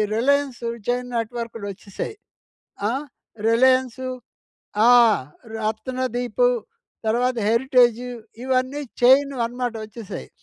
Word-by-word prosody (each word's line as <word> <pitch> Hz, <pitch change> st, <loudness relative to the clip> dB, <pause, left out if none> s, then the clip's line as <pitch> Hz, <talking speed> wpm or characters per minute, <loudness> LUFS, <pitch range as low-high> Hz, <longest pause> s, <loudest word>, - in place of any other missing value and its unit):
'Reliance 275 Hz, +1 st, +1 dB, 0.3 s
chain 245 Hz, 0 st, 0 dB
నెట్‌వర్క్‌లు' 230 Hz, -2 st, -4 dB
వచ్చేసాయి. 200 Hz, -, -7 dB, 0.7 s
ఆహ్, 270 Hz, +6 st, -2 dB, 0.4 s
'రిలయన్సు', 255 Hz, +2 st, +3 dB, 0.8 s
ఆ! -, -, +8 dB, 0.6 s
'రత్నదీపు' 245 Hz, +2 st, 0 dB, 0.6 s
తర్వాత 245 Hz, +2 st, +1 dB
'హెరిటేజ్' 240 Hz, 0 st, +4 dB, 0.4 s
ఇవన్నీ 260 Hz, +2 st, 0 dB, 0.2 s
చైన్‌వి 265 Hz, 0 st, +5 dB
అన్నమాట 245 Hz, 0 st, -3 dB
వచ్చేసాయి. 215 Hz, -, -8 dB
245 Hz, 80 wpm, -23 LUFS, 230-260 Hz, 0.8 s, ఆ